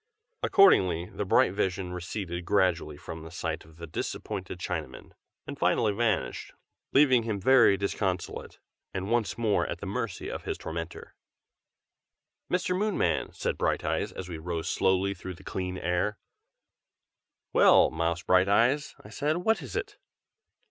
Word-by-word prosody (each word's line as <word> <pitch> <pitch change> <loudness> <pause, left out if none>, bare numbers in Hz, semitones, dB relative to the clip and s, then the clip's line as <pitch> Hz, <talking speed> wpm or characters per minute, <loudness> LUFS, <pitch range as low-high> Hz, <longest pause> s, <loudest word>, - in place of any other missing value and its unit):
Accordingly 90 - +4
the 105 - -3
bright 95 - +4
vision 95 -2 -2
receded 90 0 -4
gradually 85 -6 +1
from 80 +2 -8
the 80 - -9
sight 80 0 -4
of 80 0 -18
the 85 - -7
disappointed 80 - -5
Chinaman, - - -5 0.3
and - - -7
finally 110 -3 +2
vanished, 110 -2 -1 0.4
leaving 130 -3 +5
him 110 -3 -3
very 120 -2 +5
disconsolate, 95 -2 -3 0.4
and 95 +3 -3
once 120 -3 +1
more 110 -4 +1
at - - -4
the - - -6
mercy - - -4
of - - -5
his - - -3
tormentor. 85 +1 -6 1.4
"Mr 180 0 +1
Moonman!" 210 +2 0
said - - -2
Brighteyes, - - 0
as 95 - -7
we 85 -3 -6
rose 85 0 -4
slowly 95 +1 +2
through 95 -1 -8
the 95 - -16
clear 90 -1 -4
air. 90 +5 0 1.4
"Well, - - +6
Mouse 85 +2 -1
Brighteyes!" 110 +10 +3
I - - -10
said, 150 +7 -1
"what 205 +2 +1
is 125 - -8
it?" - - -4
95 Hz, 140 wpm, -28 LUFS, 85-115 Hz, 1.4 s, Well